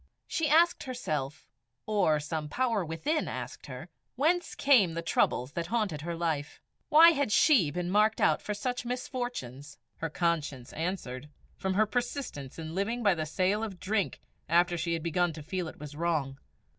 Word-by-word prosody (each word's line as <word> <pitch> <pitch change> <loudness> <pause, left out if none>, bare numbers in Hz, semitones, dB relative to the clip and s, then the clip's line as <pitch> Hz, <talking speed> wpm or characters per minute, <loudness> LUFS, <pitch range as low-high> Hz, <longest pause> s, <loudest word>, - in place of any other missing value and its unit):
She 320 -2 -1
asked 335 +3 +4
herself, 155 - -4 0.4
or 200 -8 +2
some 150 0 -4
power 235 -1 0
within 225 - -1
asked - - -6
her, - - -8 0.3
whence 335 +7 +1
came 220 - +4
the 170 - -3
troubles 130 -5 +1
that 170 0 -3
had 235 - 0
haunted 190 -10 -1
her 170 +2 -4
life. 160 -3 -2 0.3
Why 330 +3 +9
had 285 -7 0
she 230 - +5
been 175 +3 -3
marked 215 +2 +3
out - - +3
for 210 - -3
such 245 +4 -3
misfortunes? 240 - -5 0.2
Her 165 - -3
conscience 155 -6 -2
answered 150 -5 -4 0.3
from 190 0 -2
her 215 +2 +4
persistence 240 - -4
in 160 -1 -6
living 225 +6 -1
by 200 -3 +5
the 155 -2 -3
sale 190 +6 +1
of 195 -5 -5
drink 205 -1 -1 0.3
after 175 +1 +3
she 170 0 -1
had 165 -1 -2
begun 170 0 +1
to 155 -1 -9
feel 180 +2 -3
it - - -10
was 150 0 -8
wrong. 150 -5 -1
175 Hz, 175 wpm, -29 LUFS, 155-235 Hz, 0.4 s, Why